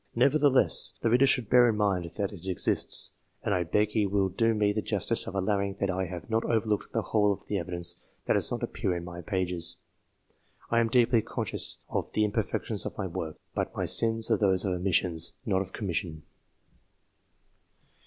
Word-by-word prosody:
Nevertheless, 140 Hz, +2 st, +4 dB
the 115 Hz, -, +1 dB
reader 125 Hz, +3 st, +5 dB
should 125 Hz, -4 st, +2 dB
bear 120 Hz, +1 st, +6 dB
in 110 Hz, -, 0 dB
mind 95 Hz, -5 st, 0 dB
that 100 Hz, 0 st, -2 dB
it 95 Hz, -1 st, -10 dB
exists; 95 Hz, -, 0 dB, 0.3 s
and 100 Hz, -, 0 dB
I 90 Hz, -, +1 dB
beg 105 Hz, +6 st, +1 dB
he 105 Hz, -1 st, +1 dB
will 100 Hz, -1 st, +1 dB
do 115 Hz, +4 st, +1 dB
me 105 Hz, -1 st, +2 dB
the 110 Hz, -, -1 dB
justice -, -, +1 dB
of -, -, -6 dB
allowing 100 Hz, 0 st, 0 dB
that 100 Hz, -1 st, -1 dB
I 95 Hz, 0 st, -2 dB
have 90 Hz, -1 st, -8 dB
not 115 Hz, 0 st, 0 dB
overlooked 110 Hz, -3 st, -1 dB
the 115 Hz, -, -1 dB
whole 105 Hz, -1 st, +2 dB
of 100 Hz, -, -5 dB
the 100 Hz, -, -2 dB
evidence 85 Hz, 0 st, -1 dB, 0.3 s
that -, -, +2 dB
does -, -, +2 dB
not -, -, -3 dB
appear 90 Hz, -, -2 dB
in 85 Hz, -, -4 dB
my 85 Hz, 0 st, -8 dB
pages. 90 Hz, -3 st, -1 dB, 0.9 s
I 115 Hz, -, +4 dB
am 115 Hz, -, +2 dB
deeply 120 Hz, -1 st, +4 dB
conscious -, -, -2 dB
of -, -, -3 dB
the 110 Hz, -, +2 dB
imperfection 105 Hz, -, -2 dB
of -, -, -6 dB
my -, -, -2 dB
work, 80 Hz, -1 st, -5 dB, 0.2 s
but -, -, -3 dB
my -, -, -1 dB
sins 115 Hz, 0 st, +2 dB
are 110 Hz, -, +4 dB
those 95 Hz, -3 st, +2 dB
of 95 Hz, -, 0 dB
omission, 90 Hz, -1 st, +1 dB, 0.3 s
not 95 Hz, -4 st, +1 dB
of 95 Hz, -1 st, -6 dB
commission. 85 Hz, -6 st, -4 dB
100 Hz, 195 wpm, -28 LUFS, 90-110 Hz, 0.9 s, bear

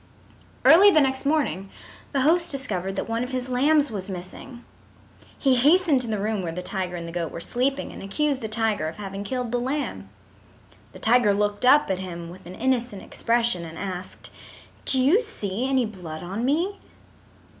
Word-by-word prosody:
Early 385 Hz, +5 st, +9 dB
the 320 Hz, -, +5 dB
next 265 Hz, -1 st, +1 dB
morning 280 Hz, -11 st, 0 dB, 0.4 s
the 275 Hz, -, +1 dB
host 335 Hz, +5 st, +3 dB
discovered 195 Hz, -, -2 dB
that -, -, -3 dB
one 230 Hz, +1 st, -1 dB
of 250 Hz, -, -5 dB
his 255 Hz, -1 st, -3 dB
lambs 285 Hz, +3 st, +3 dB
was 200 Hz, -2 st, -5 dB
missing. 190 Hz, +7 st, -8 dB, 0.7 s
He 265 Hz, -2 st, +3 dB
hastened 300 Hz, +1 st, +4 dB
to 245 Hz, -, -5 dB
the 215 Hz, -1 st, -1 dB
room 210 Hz, 0 st, -1 dB
where 170 Hz, -2 st, -3 dB
the 180 Hz, +2 st, -5 dB
tiger 185 Hz, -2 st, -3 dB
and 170 Hz, -1 st, -6 dB
the -, -, -6 dB
goat 170 Hz, -2 st, -3 dB
were -, -, -6 dB
sleeping 265 Hz, +9 st, -1 dB
and -, -, -10 dB
accused 275 Hz, +7 st, -1 dB
the 220 Hz, -, -3 dB
tiger 220 Hz, -6 st, 0 dB
of 160 Hz, -, -7 dB
having 195 Hz, -1 st, -6 dB
killed 250 Hz, +2 st, -3 dB
the 245 Hz, -, 0 dB
lamb. 250 Hz, -, -3 dB, 0.8 s
The -, -, -10 dB
tiger 225 Hz, -3 st, +3 dB
looked 205 Hz, +3 st, 0 dB
up 285 Hz, -4 st, +5 dB
at 185 Hz, -, -1 dB
him 170 Hz, -2 st, -7 dB
with 185 Hz, 0 st, -13 dB
an 180 Hz, -, -9 dB
innocent 240 Hz, -4 st, -1 dB
expression 230 Hz, -6 st, +1 dB
and 165 Hz, -1 st, -9 dB
asked, 185 Hz, -1 st, -6 dB, 0.5 s
"Do 265 Hz, -, +1 dB
you 300 Hz, -, +4 dB
see 245 Hz, -, -3 dB
any 260 Hz, -2 st, +2 dB
blood 175 Hz, -7 st, -8 dB
on 195 Hz, +7 st, -3 dB
me?" 345 Hz, +9 st, 0 dB
230 Hz, 185 wpm, -24 LUFS, 190-270 Hz, 0.8 s, Early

